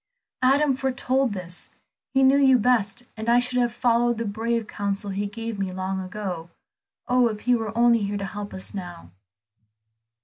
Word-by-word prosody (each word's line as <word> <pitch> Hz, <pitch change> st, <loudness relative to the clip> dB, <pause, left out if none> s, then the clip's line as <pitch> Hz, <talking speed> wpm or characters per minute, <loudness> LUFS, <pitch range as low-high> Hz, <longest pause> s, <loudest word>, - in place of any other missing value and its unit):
"Adam 275 Hz, +2 st, +4 dB
foretold 265 Hz, -1 st, 0 dB
this. 180 Hz, -2 st, -3 dB, 0.5 s
He 265 Hz, -, +5 dB
knew 270 Hz, +1 st, +5 dB
you 265 Hz, -2 st, +6 dB
best, 240 Hz, -1 st, +1 dB
and 220 Hz, +1 st, -3 dB
I 240 Hz, -, +5 dB
should 250 Hz, 0 st, +1 dB
have 240 Hz, -1 st, +2 dB
followed 240 Hz, 0 st, +2 dB
the 230 Hz, -, -2 dB
brave 225 Hz, +2 st, -1 dB
counsel 200 Hz, -1 st, -3 dB
he 200 Hz, +1 st, -2 dB
gave 225 Hz, 0 st, -6 dB
me 190 Hz, -1 st, -2 dB
long 190 Hz, +1 st, -3 dB
ago. 185 Hz, -3 st, -5 dB, 0.6 s
Oh, 250 Hz, -1 st, +4 dB
if 215 Hz, -2 st, -4 dB
he 250 Hz, -, +2 dB
were 225 Hz, -2 st, -2 dB
only 235 Hz, -1 st, +5 dB
here 205 Hz, 0 st, -2 dB
to 200 Hz, -, -3 dB
help 205 Hz, +1 st, -6 dB
us 190 Hz, -, -5 dB
now!" 175 Hz, -, -8 dB
225 Hz, 175 wpm, -24 LUFS, 200-245 Hz, 0.6 s, you